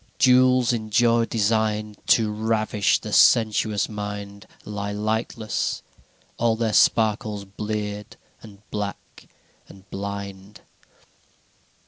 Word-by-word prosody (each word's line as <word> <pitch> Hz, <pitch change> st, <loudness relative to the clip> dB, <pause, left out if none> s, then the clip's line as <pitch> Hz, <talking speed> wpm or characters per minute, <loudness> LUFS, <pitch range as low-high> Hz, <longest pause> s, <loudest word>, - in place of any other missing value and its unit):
IV -, -, -38 dB
Jewels 125 Hz, -1 st, +4 dB
in 110 Hz, -2 st, -4 dB
joy 115 Hz, +2 st, +3 dB
designed 110 Hz, -1 st, 0 dB
To 110 Hz, -2 st, +3 dB
ravish 110 Hz, -1 st, +1 dB
the -, -, -8 dB
sensuous 110 Hz, -2 st, +3 dB
mind 105 Hz, -1 st, -7 dB, 0.2 s
Lie 100 Hz, -1 st, -4 dB
lightless, 110 Hz, +1 st, -2 dB, 0.5 s
all 115 Hz, -1 st, +1 dB
their 110 Hz, -1 st, -1 dB
sparkles 110 Hz, -2 st, +2 dB
bleared 105 Hz, +1 st, -5 dB, 0.2 s
and 105 Hz, -1 st, -15 dB
black 105 Hz, -1 st, -6 dB, 0.4 s
and 95 Hz, 0 st, -16 dB
blind. 100 Hz, 0 st, -7 dB
105 Hz, 100 wpm, -23 LUFS, 100-110 Hz, 0.5 s, Jewels